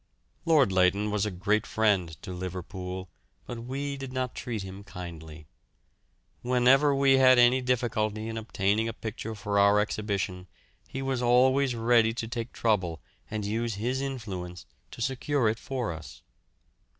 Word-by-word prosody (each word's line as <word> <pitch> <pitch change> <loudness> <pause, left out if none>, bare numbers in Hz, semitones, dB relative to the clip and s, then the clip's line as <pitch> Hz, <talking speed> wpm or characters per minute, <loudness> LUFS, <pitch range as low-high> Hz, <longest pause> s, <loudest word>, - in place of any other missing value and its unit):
Lord 150 -10 +4
Leighton 95 +3 +2
was 105 0 0
a - - 0
great 100 +3 0
friend 100 -7 +1
to 95 -3 -6
Liverpool, 90 +1 -6 0.4
but 115 -1 -7
we 140 +2 -3
did 135 -1 -7
not 130 -1 -2
treat 115 -5 -4
him 95 +1 -9
kindly. 80 -5 -9 1.0
Whenever 130 +3 +4
we 135 -1 +4
had 130 -1 +6
any 120 +2 +5
difficulty 115 -4 -1
in 115 - -4
obtaining 110 0 0
a 115 - -3
picture 110 0 -6
for 100 0 -1
our 100 +1 +5
exhibition 100 -3 -2 0.4
he 135 - -5
was 135 -2 -1
always 130 +2 +3
ready 115 -1 +3
to 115 - -3
take 115 0 -4
trouble 95 -8 0 0.3
and 105 -1 -3
use 115 +1 -1
his 125 +6 -2
influence 95 -10 -5 0.2
to 120 - -5
secure 135 -1 0
it 110 +1 0
for 125 -7 -3
us. 80 0 -11
110 Hz, 150 wpm, -28 LUFS, 95-125 Hz, 1.0 s, had